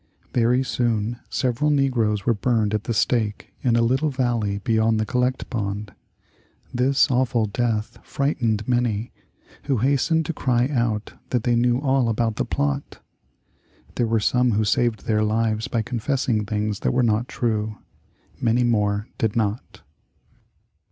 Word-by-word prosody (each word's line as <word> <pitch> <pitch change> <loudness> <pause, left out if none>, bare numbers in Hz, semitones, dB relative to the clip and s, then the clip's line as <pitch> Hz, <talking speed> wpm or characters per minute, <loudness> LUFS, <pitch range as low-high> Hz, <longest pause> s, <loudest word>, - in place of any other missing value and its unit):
Very 125 +2 +3
soon 120 -2 -1
several 130 +4 0
negroes 120 -8 +1
were 120 - +3
burned 110 -1 0
at 105 0 -1
the 115 - -1
stake 105 -1 0
in 120 -3 +2
a 115 - +3
little 130 +6 +1
valley 120 -7 -1
beyond 110 +1 +1
the 110 - 0
Collect 125 +3 -1
Pond. 105 -2 -3 0.8
This 130 +3 +3
awful 125 -2 +2
death 115 +1 -2
frightened 115 -7 -1
many, 120 -3 0 0.5
who 135 -3 +1
hastened 140 +7 +2
to 165 - -2
cry 125 -4 +1
out 115 -6 -1 0.2
that 125 -3 0
they 120 -1 +2
knew 120 +1 +3
all 135 -3 +2
about 115 -1 0
the - - 0
plot. 140 0 -2 0.9
There 120 - 0
were 115 0 +2
some 125 +2 +2
who 110 +2 +2
saved 115 +2 +1
their 110 -1 +1
lives 110 0 0
by 115 -2 -1
confessing 120 -2 -1
things 105 -1 -2
that - - 0
were 125 0 +2
not 115 +1 +1
true; 110 -2 -2 0.6
many 120 +1 +2
more 105 -3 +1
did 110 0 0
not. 110 0 -2
115 Hz, 150 wpm, -23 LUFS, 110-125 Hz, 0.9 s, Very